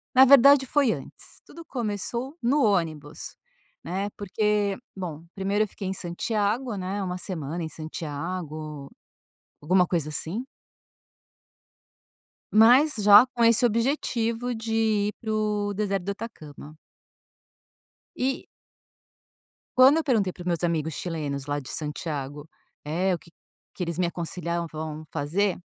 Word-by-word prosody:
Na 260 +1 +9
verdade, 275 +1 +7
foi 280 -5 +3
antes. - - -8
Tudo 335 0 -12
começou 240 - -3
no 270 +5 +2
ônibus, 160 -8 -1 0.5
né, 195 +3 -2
porque 205 0 0 0.2
bom, 165 -4 -6
primeiro 200 +2 +1
eu - - -3
fiquei 195 0 -7
em 190 - -1
Santiago, 210 +6 -1
né, 190 +2 -3
1 180 -1 -3
semana 170 -3 -4
em 160 - -4
Santiago, 155 -2 -6 0.7
alguma 180 +4 +3
coisa 165 -4 -1
assim. 190 +11 -3 2.1
Mas 250 +8 +6
já 205 +3 +8
com 235 - +2
esse 230 +1 +5
objetivo 235 0 0
de 225 0 -4 0.4
ir - - -7
para 220 -1 -3
o 210 -1 0
deserto 200 -2 -1
do 200 - -1
Atacama. 155 -9 -9 1.4
E 265 +1 -1 1.3
Quando 265 +4 +8
eu 325 - +1
perguntei 220 -10 +1
para 175 - -13
os - - -8
meus 175 -1 -1
amigos 160 -2 0
chilenos, 145 -4 -4
lá 145 0 -1
de 130 - -11
Santiago, 150 -1 -4 0.4
eh, 175 +6 0
o - - -6
que 170 - -19 0.4
que 185 - -3
eles 170 -2 -3
me 180 - +2
aconselhavam 170 -2 -4
fazer. 175 +6 0
190 Hz, 130 wpm, -26 LUFS, 160-225 Hz, 2.1 s, Na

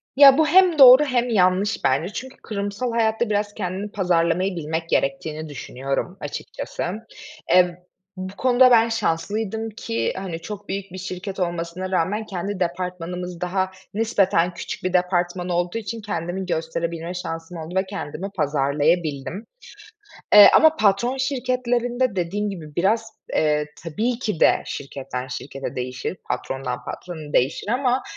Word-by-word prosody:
Ya, 275 -1 +9
bu 315 -1 +4
hem 360 -1 +5
doğru 260 +2 +10
hem 250 -3 0
yanlış 195 0 +2
bence. 155 +9 +1
Çünkü 260 0 -7
kurumsal 205 +3 -3
hayatta 225 0 +1
biraz 205 0 0
kendini 190 +3 -4
pazarlamayı 180 0 +1
bilmek 160 0 -3
gerektiğini 155 +3 -1
düşünüyorum 135 +6 -4
açıkçası. 145 - -6 0.7
Eee, 180 -1 +3 0.3
bu 185 +1 -6
konuda 255 0 +5
ben 230 -1 +5
şanslıydım 220 +2 -1
ki, 115 - -2
hani, 185 -4 -5
çok 205 +4 -8
büyük 195 0 -4
bir 185 - -8
şirket 190 +1 -6
olmasına 175 +1 -3
rağmen 195 +5 0
kendi 195 0 -4
departmanımız 180 0 -4
daha 185 +1 -1 0.2
nispeten 195 -5 +2
küçük 170 - -6
bir 185 0 -1
departman 180 0 0
olduğu 175 +4 -1
için 225 +1 -5
kendimi 190 -2 -3
gösterebilme 165 0 -3
şansım 165 -1 -6
oldu 165 +2 -7
ve 190 +1 +2
kendimi 190 -1 -5
pazarlayabildim. 150 - 0 0.9
Eee, 210 0 +11
ama 315 0 +6
patron 215 +4 +2
şirketlerinde 250 -3 0
dediğim 200 +4 -1
gibi 155 -6 -9
biraz, 220 +5 +1 0.3
eee, 150 -1 +2 0.2
tabii 225 +9 -1
ki 210 -9 -3
de - - +4
şirketten 130 -2 -5
şirkete 135 +2 -6
değişir, 130 +7 -4
patrondan 130 -2 -3
patrona 160 -2 -7
değişir 135 +10 +1
ama 250 +2 +1
185 Hz, 135 wpm, -23 LUFS, 165-220 Hz, 0.9 s, Eee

